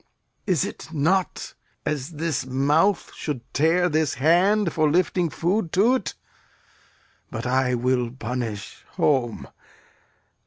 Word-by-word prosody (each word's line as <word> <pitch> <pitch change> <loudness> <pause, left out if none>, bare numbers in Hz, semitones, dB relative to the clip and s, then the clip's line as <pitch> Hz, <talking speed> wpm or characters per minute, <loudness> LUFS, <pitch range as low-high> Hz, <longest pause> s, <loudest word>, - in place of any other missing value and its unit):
Is 180 -8 +2
it - - -8
not 170 +4 0 0.3
as 150 -1 -2
this 160 -2 -2
mouth 145 +9 +1
should 145 -6 -4
tear 165 +5 +3
this 155 -4 0
hand 175 +6 +3
For 155 -1 +2
lifting 175 +1 +1
food 170 - -1
to't? 230 +5 +2 1.1
But 115 - -5
I 125 0 +1
will 125 0 0
punish 115 -4 -5
home! 125 -6 0
150 Hz, 110 wpm, -24 LUFS, 130-175 Hz, 1.1 s, tear